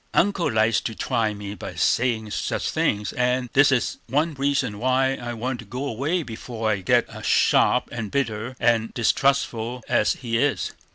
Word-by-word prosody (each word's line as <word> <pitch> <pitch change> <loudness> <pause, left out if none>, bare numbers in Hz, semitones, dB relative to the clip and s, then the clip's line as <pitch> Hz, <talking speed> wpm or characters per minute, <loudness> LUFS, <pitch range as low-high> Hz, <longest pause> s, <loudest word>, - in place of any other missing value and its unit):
"Uncle 200 -2 +2
likes 110 0 +2
to 110 - -4
try 115 -4 0
me 100 -1 -6
by - - -8
saying 115 -3 +1
such - - -2
things, 105 -1 0
and 125 0 0
this 145 +1 +5
is 125 -3 0
one 155 +4 +1
reason 135 -6 -1
why 130 +2 +2
I 120 -2 -5
want 120 +2 -3
to 115 - -9
go 125 +7 -5
away 145 +8 -1
before 115 -2 -4
I 100 -2 -1
get - - +1
sharp - - +3
and 115 -3 -4
bitter 120 -2 -2
and 115 -1 +2
distrustful 120 -1 +1
as - - +2
he 115 -3 -2
is. 135 -7 0
120 Hz, 170 wpm, -24 LUFS, 110-135 Hz, -, this